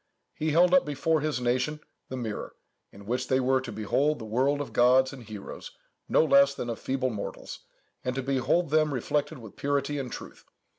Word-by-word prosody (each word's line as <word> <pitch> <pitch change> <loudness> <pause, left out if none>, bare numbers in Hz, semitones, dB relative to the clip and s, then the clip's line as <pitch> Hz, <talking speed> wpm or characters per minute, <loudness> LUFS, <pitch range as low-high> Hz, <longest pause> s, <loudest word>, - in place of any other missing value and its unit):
He 155 - -2
held 175 +4 +4
up 185 - +6
before 150 +2 0
his 150 -4 -1
nation 125 +5 0 0.3
the 130 - -4
mirror, 110 -4 -5 0.4
in 100 0 -13
which 120 +4 -2
they 130 - +2
were 130 0 +2
to 130 - -7
behold 140 +8 0
the 110 - -8
world 130 +6 +1
of 145 - -5
gods 130 +2 +4
and 135 - -9
heroes 110 -3 -9 0.3
no - - +4
less 140 -1 +5
than 120 - -3
of 115 - -6
feeble 130 -1 -1
mortals, 105 -3 -6 0.4
and 125 0 -2
to 135 - -2
behold 135 +5 +1
them 155 -2 +3
reflected 140 +4 -1
with 110 -5 -12
purity 145 0 -1
and 130 -3 -5
truth. - - -9
130 Hz, 195 wpm, -28 LUFS, 125-145 Hz, 0.4 s, up